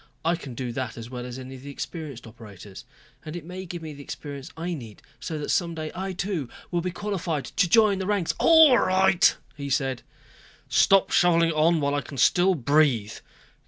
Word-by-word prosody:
I 170 +1 +3
can 140 -7 -9
do 125 0 -4
that 120 -1 -4
as 115 +1 -8
well 125 -1 -6
as 125 0 -7
any 130 0 -9
of 130 - -10
the 140 - -9
experienced 140 -3 -7
operators. 105 -3 -12 0.4
And 155 +1 -7
it 170 -3 -7
may 185 +2 -7
give 175 -1 -7
me 155 -1 -7
the 145 - -11
experience 140 -1 -8
I 175 +2 -3
need, 115 -9 -9 0.2
so 160 - -5
that 150 - -5
some 170 -2 0
day, 155 -1 -5
I, 190 +2 -4
too, 180 -7 -3 0.2
will 175 -1 0
be 180 - -2
qualified 180 -7 -3
to 180 +5 0
join 215 -1 +4
the 190 - -3
ranks...." 200 -5 0
"All 320 -6 +7
right," 185 0 +3 0.2
he 140 -1 -6
said. 135 -3 -1 0.7
"Stop 195 -1 +4
shoveling 170 -1 +4
it - - -1
on 160 +1 +3
while 140 0 0
I 145 - 0
can 140 - -10
still 180 +8 +4
breathe. 135 -6 +2
155 Hz, 205 wpm, -25 LUFS, 130-180 Hz, 0.7 s, All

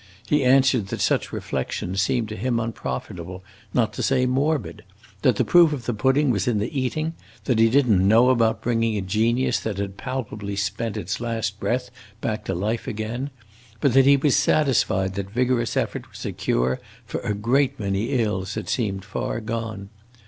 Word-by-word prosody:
He 150 -2 +2
answered 130 -4 +4
that - - -4
such - - +1
reflections 95 +2 -2
seemed 115 +3 0
to 110 - -5
him 120 +3 0
unprofitable, 90 -5 -5 0.3
not 115 -1 +1
to - - -4
say 130 -1 +2
morbid; 135 -4 -1 0.4
that 125 - +4
the - - +1
proof 170 -3 +6
of 130 -5 -5
the 120 - -1
pudding 130 +5 +2
was 100 -3 -1
in 120 -3 +2
the 105 +8 -3
eating; 155 +5 -1 0.3
that 125 -5 +1
he 115 0 +6
did 135 +2 +3
n't 100 -5 +4
know 115 +6 +5
about 115 -3 +1
bringing 115 -2 +1
a - - -1
genius 115 +6 +1
that 110 -3 -4
had 100 -1 -4
palpably 105 -6 -4
spent 100 +2 -2
its 90 +3 -3
last 115 -3 -2
breath 125 +2 -1 0.3
back 110 -2 -2
to 95 - -2
life 110 +6 -2
again, 115 +6 -3 0.5
but 135 +1 +2
that 135 0 +6
he 140 0 +7
was 140 0 +2
satisfied 110 -10 +2
that 100 0 -4
vigorous 120 0 0
effort - - -2
was - - -9
a - - -2
cure 65 +1 0 0.3
for - - -4
a 105 - -2
great 130 +6 +1
many 100 0 -1 0.2
ills 95 -2 -2
that - - -5
seemed 100 -6 -1
far 105 +2 -3
gone. 110 -3 -5
115 Hz, 185 wpm, -23 LUFS, 100-130 Hz, 0.5 s, he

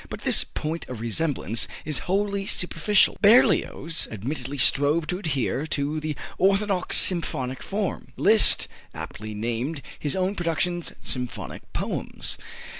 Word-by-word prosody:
But - - -7
this - - +6
point 160 +2 -5
of 125 -3 -6
resemblance 115 -1 -1 0.2
is 150 -2 +1
wholly 200 0 -1
superficial. 205 +3 +2
Berlioz 200 -7 +3
admittedly 130 +5 -5
strove 145 +4 +2
to 180 +4 -3
adhere 150 - -2
to 150 0 -2
the 155 -1 -4 0.2
orthodox 195 -1 +3
symphonic 135 -8 +3
form. 200 -1 -4
Liszt 215 +1 +5 0.3
aptly 110 0 -8
named 120 +7 -3 0.2
his 145 - -1
own 190 +1 0
productions 175 -1 -2
"symphonic 125 -2 -5
poems." - - -3
155 Hz, 120 wpm, -24 LUFS, 135-185 Hz, 0.3 s, this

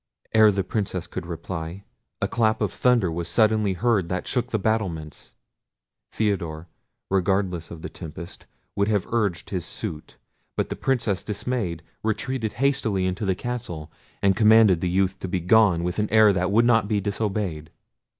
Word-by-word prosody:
Ere 110 -1 +7
the 95 -1 -1
Princess 95 -3 -2
could 90 -1 -6
reply, 85 +2 -6 0.4
a - - +2
clap 110 -2 +1
of - - -1
thunder 120 -8 +2
was 85 +1 -3
suddenly 110 0 +3
heard 100 -2 +1
that 90 0 -2
shook 125 -2 0
the 115 - -1
battlements. 95 -8 -3 0.8
Theodore, 85 -7 -2 0.4
regardless 95 -3 0
of 85 -1 -9
the - - -3
tempest, 85 +1 -9 0.3
would 100 0 +1
have 105 -4 +1
urged 105 -7 -1
his 90 -4 -2
suit: 75 0 -6 0.4
but - - 0
the - - -3
Princess, 115 -8 0
dismayed, 105 -6 -3 0.2
retreated 110 +1 -2
hastily 125 -8 +1
into 95 +4 -2
the 95 - +2
castle, 105 -10 -5 0.3
and 100 -1 +4
commanded 110 -4 +6
the 90 - 0
youth 95 +1 +1
to - - -4
be 95 0 -1
gone 90 -1 +4
with 90 +3 -2
an 105 - 0
air 110 -2 +6
that 90 0 0
would 115 +3 +4
not 115 -4 +4
be 105 -1 +1
disobeyed. 100 -6 -2
100 Hz, 165 wpm, -24 LUFS, 90-110 Hz, 0.8 s, Ere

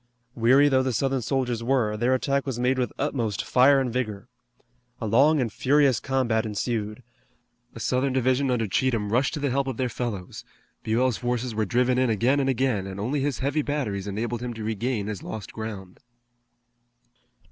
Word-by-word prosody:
Weary 130 +5 +5
though 130 -2 +3
the 130 -1 -1
Southern 135 +2 0
soldiers 125 -1 -1
were, 120 -4 +1
their 120 +4 +2
attack 140 +2 -1
was 130 -3 -2
made 125 +2 +1
with 125 - -1
utmost 120 -8 -2
fire 135 +2 +5
and 125 -3 -2
vigor. 115 -3 -3 0.7
A 115 - -4
long 140 +8 +4
and 115 -5 -1
furious 140 -2 +3
combat 125 -5 0
ensued. 110 +1 -3 0.7
A - - -8
Southern 130 +4 0
division 130 +1 +1
under 120 -3 +1
Cheatham 110 0 0
rushed 130 +6 +1
to - - -4
the 140 -2 -1
help 135 +1 0
of 130 -4 -3
their 130 -1 -1
fellows. 105 -6 -5 0.4
Buell's 120 +2 +1
forces 125 0 -2
were 110 0 0
driven 125 +4 +1
in 130 -1 +2
again 120 +6 +2
and 135 -1 +1
again, 125 -6 0
and 95 0 -7
only 130 +8 -1
his 140 -2 -1
heavy 145 +2 +1
batteries 110 -10 -3
enabled 115 +4 -3
him 120 -1 -4
to 110 - -6
regain 110 0 -2
his 105 -2 -5
lost 110 -4 -7
ground. 105 -4 -7
125 Hz, 180 wpm, -25 LUFS, 110-135 Hz, 0.7 s, Weary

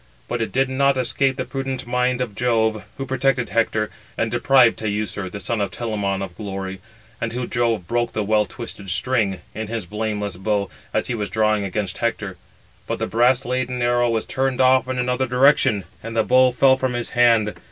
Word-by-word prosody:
But 120 - -2
it 115 - -2
did 135 0 +2
not 135 +1 +2
escape 130 +1 +1
the - - -3
prudent 135 -1 -4
mind 125 +1 0
of 120 -5 -3
Jove, 110 -2 +1
who 135 - -3
protected 130 -1 0
Hector, 110 -2 0 0.3
and - - 0
deprived 130 -4 +4
Teucer, 105 -2 -2
the 100 - -7
son 115 +1 -1
of 100 - 0
Telamon, 100 -1 -2
of 90 -3 -7
glory; 95 -2 -5 0.4
and 115 - -1
who 125 0 -2
(Jove) 115 -8 0
broke 120 +3 0
the 110 - -1
well 105 0 +2
twisted 105 -5 -7
string, 100 -4 0
in 110 0 -4
his 115 -3 -4
blameless 105 -1 -3
bow, 100 0 -1 0.2
as - - 0
he - - -2
was 105 -4 -3
drawing 110 0 +1
against 100 0 -3
[Hector]; 110 -5 -2 0.5
but - - -2
the - - -1
brass 120 +3 +2
laden 125 0 -2
arrow 120 0 +2
was 115 -1 0
turned 135 -1 -1
off 130 0 +4
in 130 0 -2
another 125 +1 0
direction, 125 -4 +4 0.2
and 115 +1 -6
the 110 - +4
bow 130 +1 +5
fell 130 +1 +4
from 130 -1 -1
his 120 -1 -3
hand. 115 -3 +4
115 Hz, 195 wpm, -22 LUFS, 105-125 Hz, 0.5 s, bow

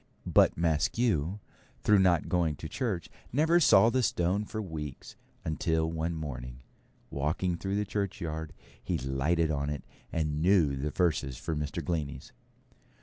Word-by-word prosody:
But - - +4
Maskew, 85 +2 +1 0.5
through 105 -1 +5
not 90 -4 +3
going 85 -4 +1
to 80 - -7
church, 100 - -2 0.2
never 160 +6 +4
saw 115 - +6
the 130 - +2
stone 95 -1 +1
for 110 +1 -5
weeks, 80 -8 -6 0.3
until 80 0 0
one 80 +1 -2
morning, 65 -5 -6 0.5
walking 80 +6 0
through 95 +3 -3
the 105 0 0
churchyard, 85 -6 -3 0.3
he - - -1
lighted 75 +5 0
on 70 -1 -1
it, 75 -3 -4 0.3
and 75 -2 -1
knew 85 -6 +4
the 70 +3 -2
verses 75 -6 0
for 80 +4 -3
Mr. 75 +2 -3
Glennie's. 75 -4 -3
80 Hz, 145 wpm, -30 LUFS, 75-95 Hz, 0.5 s, saw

